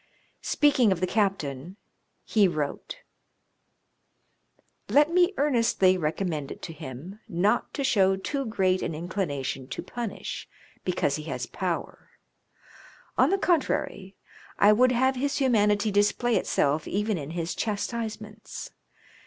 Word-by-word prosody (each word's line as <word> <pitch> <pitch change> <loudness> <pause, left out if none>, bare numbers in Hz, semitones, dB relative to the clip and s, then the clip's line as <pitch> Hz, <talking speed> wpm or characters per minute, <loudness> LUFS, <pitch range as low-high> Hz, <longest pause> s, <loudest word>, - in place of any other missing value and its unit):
Speaking 270 -7 +3
of 185 - 0
the 185 - +1
captain, 185 -5 -1 0.5
he 210 -3 +3
wrote: 155 - -4 1.3
" - - -47 0.3
Let 295 +3 +4
me 360 +1 +4
earnestly 230 -9 +3
recommend 155 -3 -2
it - - -9
to 165 - -6
him, 155 - -9
not 200 +7 +1
to 280 - -1
show 195 -7 +3
too 275 +9 -3
great 190 -4 +1
an - - -2
inclina 165 -4 -3
tion 130 -1 -4
to 130 - -5
punish, 235 -4 -6 0.3
because - - 0
he - - -6
has - - -3
power; - - -4 1.1
on - - +4
the 390 - +2
contrary, 275 - 0 0.4
I 205 +1 +6
would 250 +4 +4
have 260 +2 +2
his 280 +2 -1
humanity 210 -5 +2
display 205 +4 +2
itself 145 +2 +1
even 210 -1 -1
in 145 0 -6
his 170 0 -2
chastisements. 215 0 -4
205 Hz, 130 wpm, -27 LUFS, 175-240 Hz, 1.3 s, I